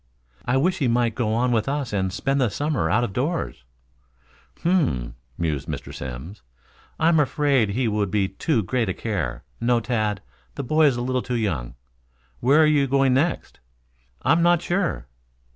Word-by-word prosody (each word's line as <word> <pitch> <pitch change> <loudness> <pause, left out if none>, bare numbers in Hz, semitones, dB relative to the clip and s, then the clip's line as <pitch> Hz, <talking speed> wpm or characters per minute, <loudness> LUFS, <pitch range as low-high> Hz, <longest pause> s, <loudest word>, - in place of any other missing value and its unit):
"I 125 +2 +2
wish 180 +7 +1
he 135 - +1
might 120 -1 +2
go 110 -2 -1
on 125 +2 +1
with 115 +1 +1
us 140 -5 -2
and 95 -2 0
spend 135 +7 0
the 125 - +2
summer 140 - -1
out 115 +4 +2
of 100 - -3
doors." 140 - -2 0.9
"H - - -25
m 170 - +3
m 180 -6 +4
m," - - -5 0.2
mused 80 -5 -2
Mr. - - -6
Simms. 65 - -7 0.6
"I 160 - +3
am 165 -2 +4
afraid 140 -5 +2
he 120 +4 0
would 105 -2 0
be 100 -1 +1
too 110 - -1
great 115 +2 -1
a 95 - -2
care. 75 - -3 0.2
No, 120 0 +2
Tad, 110 -4 -1 0.3
the - - -4
boy 155 +4 +4
is 130 -4 +1
a 120 - -2
little 130 0 0
too 125 - -3
young. 80 - -2 0.6
Where 145 +6 +5
are - - +6
you 150 -2 +3
going 135 -1 +3
next?" 150 +7 -1 0.6
"I 135 - +3
am 165 +2 +4
not 175 0 +3
sure." 175 - -1
120 Hz, 195 wpm, -23 LUFS, 100-145 Hz, 0.9 s, are